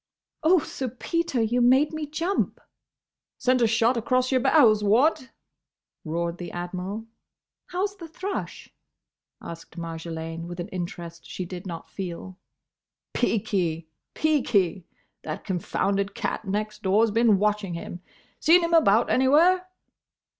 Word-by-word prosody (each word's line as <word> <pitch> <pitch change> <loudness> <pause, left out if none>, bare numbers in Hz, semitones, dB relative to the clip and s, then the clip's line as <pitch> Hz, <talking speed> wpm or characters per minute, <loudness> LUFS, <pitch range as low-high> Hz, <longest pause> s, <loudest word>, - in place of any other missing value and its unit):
"Oh, 330 +4 +5
Sir 265 -4 -3
Peter! 265 +1 -1
You 240 +3 +1
made 265 +6 +4
me 310 -1 -4
jump!" 335 +6 -1 0.8
"Sent 255 0 +2
a 230 - +5
shot 230 +3 +3
across 255 +3 +1
your 260 -1 +3
bows—what?" 255 +1 +4 0.7
roared 170 +2 -3
the 175 - -6
Admiral. 185 +5 -5 0.6
"How's 390 +3 -2
the 335 -3 -9
thrush?" 380 +5 -6 0.7
asked 170 +1 -10
Marjolaine 165 0 -5
with 175 0 -7
an 175 +4 -4
interest 170 -2 -6
she 185 - -4
did 180 +1 -7
not 165 -2 -7
feel. 185 0 -7 0.7
"Peaky. 175 -8 0 0.3
Peaky. 205 - +1 0.3
That 155 - -6
confounded 195 +2 -1
cat 220 - -3
next 210 +2 -3
door's 210 +3 +3
been 225 -2 +4
watching 205 -3 0
him. 175 +1 -7 0.4
Seen 340 +3 +6
him 335 0 -1
about 235 -10 +5
anywhere?" 335 +8 +4
215 Hz, 125 wpm, -25 LUFS, 175-265 Hz, 0.8 s, Seen